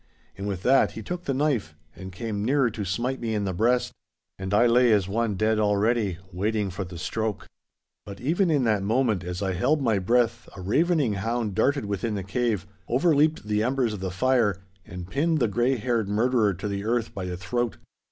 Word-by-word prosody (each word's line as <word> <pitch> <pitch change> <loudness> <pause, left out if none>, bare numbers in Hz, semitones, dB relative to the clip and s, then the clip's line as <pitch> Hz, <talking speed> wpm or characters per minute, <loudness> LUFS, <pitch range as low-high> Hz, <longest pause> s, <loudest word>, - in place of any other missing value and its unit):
And 100 +1 -5
with 95 -2 -4
that 135 +2 +4
he - - -7
took 175 0 -5
the 135 - 0
knife 130 - 0 0.2
and 95 0 -8
came 105 +1 -4
nearer 130 0 +2
to 105 -1 -4
smite 120 +8 -2
me 115 -2 -1
in 105 - -1
the 95 -2 -2
breast, 120 +7 +1 0.5
and 95 0 -4
I 105 +4 +4
lay 120 0 +5
as 100 -4 +3
one 110 +1 -1
dead 110 +2 +1
already, 105 -2 +1 0.2
waiting 105 +1 -1
for 95 +2 -4
the 90 -1 -9
stroke. 110 +5 -3 0.6
But 100 -1 -9
even 170 +8 +1
in 145 -4 +2
that 110 -4 +2
moment 110 -2 +1
as 90 +2 -4
I 95 -1 0
held 145 - +1
my 115 -7 +1
breath 115 +3 +1
a - - -7
ravening 145 - +2
hound 110 +1 -2
darted 140 +5 +1
within 105 +2 -2
the 100 - -3
cave, 105 -1 -1 0.2
overleaped 155 +3 +2
the 105 0 +1
embers 125 -1 0
of 105 - -5
the 95 0 -3
fire, 105 -2 +1 0.2
and 90 0 -7
pinned 160 - +1
the 120 -5 +2
grey 120 +6 +1
haired 115 -3 -1
murderer 110 -1 +2
to 95 +4 -5
the 100 -1 -3
earth 115 +1 -1
by 95 - -5
the 90 -1 -4
throat. 120 +5 -2
110 Hz, 205 wpm, -25 LUFS, 100-125 Hz, 0.6 s, lay